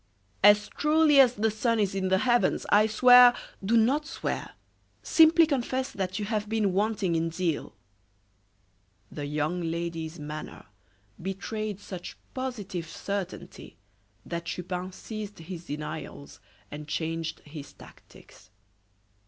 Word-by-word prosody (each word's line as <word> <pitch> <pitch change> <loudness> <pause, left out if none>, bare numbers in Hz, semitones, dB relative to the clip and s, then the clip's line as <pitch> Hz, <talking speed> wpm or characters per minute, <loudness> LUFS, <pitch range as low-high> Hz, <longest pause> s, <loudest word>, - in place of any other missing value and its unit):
"As 205 +1 +6
truly 300 -1 +3
as 250 -2 +6
the 220 +1 +1
sun 230 +1 0
is 200 -2 +1
in 190 -1 -1
the 190 0 +3
heavens 240 +3 +2
I 210 +1 +5
swear 245 +2 +7
" - - -25
"Do 225 +4 +3
not 270 +7 +2
swear; - - -4 0.5
simply 330 0 +6
confess 260 -3 -2
that 185 -1 -3
you 210 - -2
have 210 -1 -2
been 215 -4 +1
wanting 205 -3 0
in 165 0 0
zeal." 165 -2 -3 1.4
The 145 -1 -5
young 155 +4 -1
lady's 165 -1 -4
manner 150 +1 -7 0.6
betrayed 200 +2 -4
such 185 -3 -8 0.2
positive 205 -10 -5
certainty 185 - -6 0.5
that 170 0 -5
Chupin 180 +2 -4
ceased 210 +1 -7
his 170 +1 -8
denials 145 -1 -7 0.3
and 150 0 -8
changed 165 +1 -3
his 145 -1 -10
tactics. - - -17
195 Hz, 130 wpm, -27 LUFS, 170-225 Hz, 1.4 s, swear